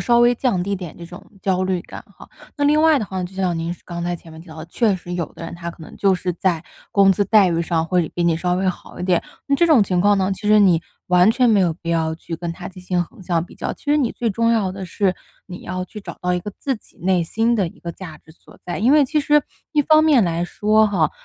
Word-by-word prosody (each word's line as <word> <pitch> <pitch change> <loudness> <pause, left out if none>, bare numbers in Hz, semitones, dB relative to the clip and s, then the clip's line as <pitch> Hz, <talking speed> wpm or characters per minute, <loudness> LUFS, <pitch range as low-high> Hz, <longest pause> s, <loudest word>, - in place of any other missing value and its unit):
稍 240 -1 +3
微 240 0 +5
降 240 -6 0
低 200 +2 -2
点 180 -4 -8
这 170 - -9
种 175 0 -12 0.2
焦 185 -1 +1
虑 185 -2 -1
感 - - -10
哈。 - - -14 0.3
那 290 - 0
另 300 +2 +4
外 315 -2 +5
的 215 - -2
话， 190 -1 -4
就 180 +1 -7
像 185 -3 -1
您 165 +1 -3
刚 170 -1 -6
才 175 0 -2
前 165 -1 -15
面 160 - -11
提 165 - -15
到 160 - -11
的， 155 - -8
确 210 +4 +1
实 175 0 -9
有 175 -2 -2
的 - - -8
人 165 - -7
他 170 0 -6
可 165 - -14
能 - - -11
就 195 -1 +3
是 180 0 -2
在 175 -2 -1 0.3
工 195 -1 +5
资 200 +2 0
待 205 -4 +5
遇 165 -1 0
上 165 -1 0
会 175 -2 +1
比 175 - 0
你 165 -1 +2
稍 180 +1 0
微 185 +1 0
好 180 - -6
一 - - -5
点。 180 -2 +2 0.2
那 280 - +2
这 340 - +3
种 300 -9 +5
情 185 -3 0
况 205 +2 +4
呢， 190 +1 +1
其 210 +2 -5
实 215 - +6
你 180 -5 +4 0.3
完 180 +3 +5
全 245 +1 +3
没 210 -3 +4
有 175 -3 +2
必 170 +1 -10
要 160 -1 0
去 165 +1 -7
跟 170 0 -4
他 - - -8
进 185 -1 -13
行 180 -1 0
横 190 - -17
向 170 -2 0
比 - - -16
较， - - -4
其 - - -16
实 295 0 +2
你 270 -6 +1
最 235 - -2
重 230 +2 +1
要 210 -5 +1
的 190 0 -6
是， 185 +1 0 0.3
你 180 -1 -9
要 185 0 -4
去 210 +3 -10
找 - - -9
到 180 0 0
一 180 - -1
个 205 - -6
自 270 -3 -2
己 - - -23
内 180 0 +1
心 225 +8 0
的 200 -5 +1
一 - - -17
个 170 - -5
价 160 -5 -10
值 160 - -21
所 - - -20
在。 175 - -3
因 235 +8 +3
为 300 - +6
其 305 +3 0
实 295 0 +3 0.3
一 300 - +3
方 310 +2 +5
面 290 -7 +5
来 170 -2 0
说 215 +4 +2
哈， 170 -7 +1
185 Hz, 310 characters per minute, -20 LUFS, 175-215 Hz, 0.3 s, 实